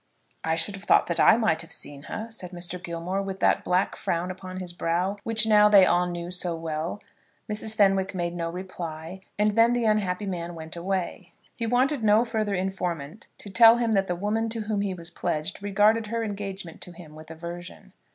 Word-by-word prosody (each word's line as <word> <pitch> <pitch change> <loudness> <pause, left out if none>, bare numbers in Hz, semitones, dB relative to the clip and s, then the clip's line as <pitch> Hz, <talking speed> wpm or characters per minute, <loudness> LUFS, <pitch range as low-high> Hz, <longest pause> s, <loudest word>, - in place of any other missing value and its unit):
"I 160 0 +1
should 165 +5 +1
have 195 +1 -9
thought - - +5
that 170 - -2
I 220 - +7
might 220 -9 +2
have 165 - -11
seen 140 -1 -2
her," 220 - -4
said 190 -5 -7
Mr. 175 0 -5
Gilmore, 175 +3 -3
with 195 -1 -5
that - - +3
black 180 +1 +1
frown 175 +2 -2
upon 185 0 -8
his 180 -2 -5
brow 175 +4 -1
which 225 -1 +2
now 210 -1 +6
they 200 -2 +8
all 180 0 +2
knew 175 0 -5
so 180 -1 -2
well. 165 +3 -4 0.5
Mrs. 215 +1 -2
Fenwick 195 -2 +3
made 175 -1 -2
no 170 -1 -3
reply, 175 -1 -7 0.2
and 210 +1 +3
then 230 +1 +5
the 240 -1 0
unhappy 210 -2 +1
man 175 -3 -4
went 160 0 -7
away. 180 0 -3 0.2
He 230 - -3
wanted 255 +2 +2
no 215 +2 +5
further 215 -3 -1
informant 180 -3 -3
to 200 - -10
tell 230 +2 +8
him 235 -2 0
that 195 -2 +2
the 180 - -1
woman 215 +5 -1
to 225 0 -3
whom 210 -1 -1
he 195 -2 -2
was 170 0 -9
pledged 160 +2 -3
regarded 210 +2 +3
her 230 +1 -2
engagement 195 -5 -5
to 180 - -8
him 165 -3 -13
with 155 0 -12
aversion. 170 +2 -9
190 Hz, 205 wpm, -26 LUFS, 170-210 Hz, 0.5 s, they